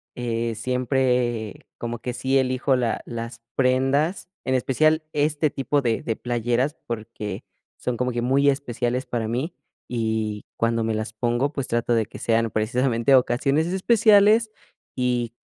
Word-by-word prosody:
eh, 115 -1 -2
siempre 125 -2 0
como 120 0 -4
que 125 +2 -4
sí 130 +2 +1
elijo 130 +1 +2
la 120 -3 0
las 115 0 -6
prendas, 135 +7 +1 0.2
en 130 - +1
especial 155 +5 +2
este 150 +1 +1
tipo 140 +1 0
de 115 -3 0
de 115 - -1
playeras 120 +5 -1
porque 110 -3 -5 0.3
son 125 - -2
como 125 +1 0
que 120 0 -2
muy 135 +3 +3
especiales 125 -2 -1
para 115 -2 -2
mí 130 +9 -2 0.3
y 110 -3 -2
cuando 115 0 +1
me 110 0 0
las 110 0 -3
pongo, 120 +5 0
pues 140 -3 -2
trato 120 +1 0
de 115 -2 +2
que 100 - -11
sean 115 0 +1
precisamente 120 +3 +2
ocasiones 135 +5 +2
especiales 215 +3 +4 0.5
y 125 -2 0
125 Hz, 145 wpm, -24 LUFS, 115-135 Hz, 0.5 s, especiales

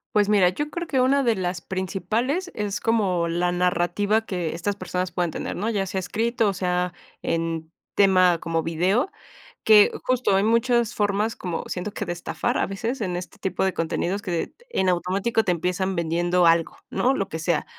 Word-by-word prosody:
Pues 205 -1 +4
mira, 200 -4 +5
yo 295 +11 -4
creo 345 -1 -4
que 265 - 0
una 275 +2 +3
de 235 -4 +2
las 180 -1 -2
principales 215 - -2
es 210 0 -2
como 190 -7 +1
la 175 +1 0
narrativa 180 +5 +1
que 175 -5 -3
estas 200 +4 -2
personas 185 -2 -3
puedan 175 -1 0
tener, - - -4
¿no? 215 +5 -2
Ya 200 -3 0
sea 190 0 -3
escrito, 225 +4 0
o - - -1
sea, 180 -1 -1 0.3
en 165 -1 -2 0.2
tema 185 -4 +4
como 165 0 -1
video, 185 - +1 0.5
que 210 -2 +7
justo, 255 -6 +2
hay 195 - +2
muchas 235 0 +2
formas 210 +2 0
como 175 -3 -4
siento 185 +3 -4
que 205 - -3
de 175 - -3
estafar 175 - -2
a - - +1
veces 225 +7 -3
en 180 -4 -2
este 180 - -7
tipo 190 0 -1
de 190 - +1
contenidos 175 +4 -1
que 175 -5 -3 0.2
en 190 - +1
automático 190 +6 +1
te 180 - +1
empiezan 180 +2 -1
vendiendo 175 +2 +1
algo, 165 0 +3
¿no? 260 +2 +2
Lo 195 -4 -2
que 160 - -4
sea, 170 +1 0
190 Hz, 190 wpm, -24 LUFS, 175-215 Hz, 0.5 s, que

